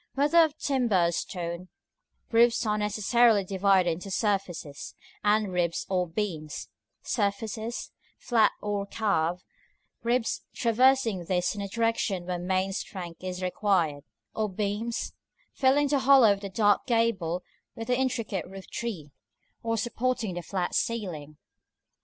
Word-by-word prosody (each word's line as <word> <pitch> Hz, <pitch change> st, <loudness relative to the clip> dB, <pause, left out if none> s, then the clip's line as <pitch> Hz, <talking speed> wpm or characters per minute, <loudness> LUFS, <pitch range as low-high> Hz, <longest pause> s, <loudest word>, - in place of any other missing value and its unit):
Whether 295 Hz, +5 st, +4 dB
of 315 Hz, -2 st, +4 dB
timber 235 Hz, -11 st, +2 dB
or -, -, -2 dB
stone, 170 Hz, 0 st, -4 dB, 0.6 s
roofs 235 Hz, 0 st, +4 dB
are 210 Hz, -1 st, +1 dB
necessarily 210 Hz, +1 st, +3 dB
divided 190 Hz, -2 st, +3 dB
into 180 Hz, +4 st, -5 dB
surfaces, 190 Hz, -8 st, -2 dB, 0.3 s
and 210 Hz, -2 st, +2 dB
ribs 170 Hz, -2 st, 0 dB
or 180 Hz, -1 st, +1 dB
beams; 160 Hz, -, -4 dB, 0.3 s
surfaces, 220 Hz, +2 st, -2 dB, 0.3 s
flat 225 Hz, -3 st, +3 dB
or 205 Hz, -1 st, -2 dB
carved; 180 Hz, -5 st, 0 dB, 0.6 s
ribs, 235 Hz, 0 st, 0 dB
traversing 235 Hz, -5 st, +3 dB
these 180 Hz, 0 st, 0 dB
in 205 Hz, -, -5 dB
the 200 Hz, -, -3 dB
directions 225 Hz, -4 st, 0 dB
where 180 Hz, -1 st, -2 dB
main 185 Hz, +2 st, 0 dB
strength 180 Hz, -3 st, -6 dB
is 185 Hz, 0 st, -4 dB
required; 180 Hz, -6 st, +1 dB, 0.3 s
or 215 Hz, -1 st, -1 dB
beams, 210 Hz, +4 st, -3 dB, 0.4 s
filling 280 Hz, +2 st, +3 dB
the 280 Hz, 0 st, +2 dB
hollow 260 Hz, -5 st, +6 dB
of 200 Hz, -, -6 dB
the 200 Hz, -, -5 dB
dark 205 Hz, +3 st, +2 dB
gable 215 Hz, -8 st, +1 dB, 0.3 s
with 225 Hz, -, -5 dB
the 250 Hz, -, +1 dB
intricate 240 Hz, -8 st, -1 dB
roof 190 Hz, +1 st, -10 dB
tree, 185 Hz, -12 st, -5 dB, 0.5 s
or 230 Hz, 0 st, -1 dB
supporting 240 Hz, -2 st, -1 dB
the 175 Hz, -, -4 dB
flat 180 Hz, 0 st, -3 dB
ceiling. 165 Hz, -10 st, -2 dB
205 Hz, 135 wpm, -28 LUFS, 180-230 Hz, 0.6 s, hollow